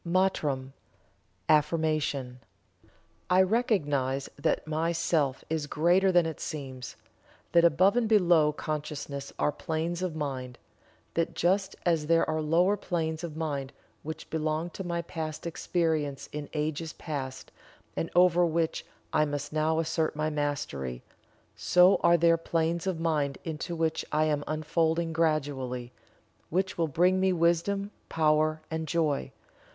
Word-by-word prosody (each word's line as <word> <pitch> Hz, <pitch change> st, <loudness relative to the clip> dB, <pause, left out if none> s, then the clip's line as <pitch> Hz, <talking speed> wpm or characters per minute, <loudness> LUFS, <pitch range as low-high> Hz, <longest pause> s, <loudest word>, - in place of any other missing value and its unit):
MANTRAM 155 Hz, -7 st, 0 dB, 0.7 s
(AFFIRMATION). 150 Hz, -4 st, +1 dB, 0.9 s
I 185 Hz, +1 st, +6 dB
recognize 145 Hz, -, 0 dB
that 150 Hz, +3 st, 0 dB
my 160 Hz, +2 st, 0 dB
Self 155 Hz, -5 st, 0 dB
is 155 Hz, -2 st, -2 dB
greater 175 Hz, +6 st, +3 dB
than 175 Hz, -2 st, +4 dB
it 160 Hz, -1 st, -4 dB
seems 130 Hz, -5 st, -6 dB, 0.6 s
that 170 Hz, -1 st, +5 dB
above 185 Hz, +5 st, +4 dB
and 235 Hz, -3 st, +1 dB
below 175 Hz, -8 st, +5 dB
consciousness 145 Hz, -2 st, -5 dB
are 150 Hz, -, +2 dB
planes 165 Hz, +2 st, -3 dB
of 180 Hz, -4 st, -2 dB
mind 130 Hz, -5 st, -4 dB, 0.6 s
that 165 Hz, 0 st, -1 dB
just 190 Hz, +3 st, +1 dB
as 165 Hz, -4 st, +1 dB
there 165 Hz, 0 st, +3 dB
are 155 Hz, 0 st, 0 dB
lower 170 Hz, +6 st, +3 dB
planes 165 Hz, -4 st, -2 dB
of 160 Hz, -2 st, -6 dB
mind 140 Hz, -4 st, -3 dB, 0.3 s
which 155 Hz, +1 st, -7 dB
belong 160 Hz, +2 st, -1 dB
to 190 Hz, -, -6 dB
my 170 Hz, -1 st, -2 dB
past 155 Hz, -2 st, -5 dB
experience 160 Hz, -4 st, -1 dB
in 150 Hz, -1 st, -6 dB
ages 155 Hz, +1 st, -2 dB
past 135 Hz, -4 st, -6 dB, 0.4 s
and 165 Hz, -, -2 dB
over 175 Hz, 0 st, +5 dB
which 165 Hz, -1 st, 0 dB, 0.3 s
I 155 Hz, -, +4 dB
must 145 Hz, 0 st, -4 dB
now 155 Hz, +1 st, +1 dB
assert 160 Hz, -1 st, 0 dB
my 155 Hz, +1 st, -1 dB
Mastery 140 Hz, -, -3 dB, 0.5 s
so 180 Hz, +2 st, +5 dB
are 170 Hz, -, +4 dB
there 165 Hz, 0 st, +4 dB
planes 165 Hz, +1 st, -1 dB
of 180 Hz, -4 st, -1 dB
mind 150 Hz, -4 st, 0 dB
into 165 Hz, +1 st, -4 dB
which 160 Hz, -1 st, 0 dB
I 155 Hz, +1 st, +2 dB
am 150 Hz, -2 st, 0 dB
unfolding 160 Hz, +2 st, 0 dB
gradually, 140 Hz, -6 st, -1 dB, 0.6 s
which 190 Hz, +3 st, 0 dB
will 165 Hz, -1 st, +1 dB
bring 180 Hz, +5 st, +3 dB
me 190 Hz, 0 st, +3 dB
wisdom, 175 Hz, +4 st, +1 dB, 0.2 s
power, 155 Hz, 0 st, +2 dB
and 160 Hz, 0 st, -3 dB
joy. 155 Hz, -3 st, 0 dB
160 Hz, 135 wpm, -28 LUFS, 150-170 Hz, 0.9 s, I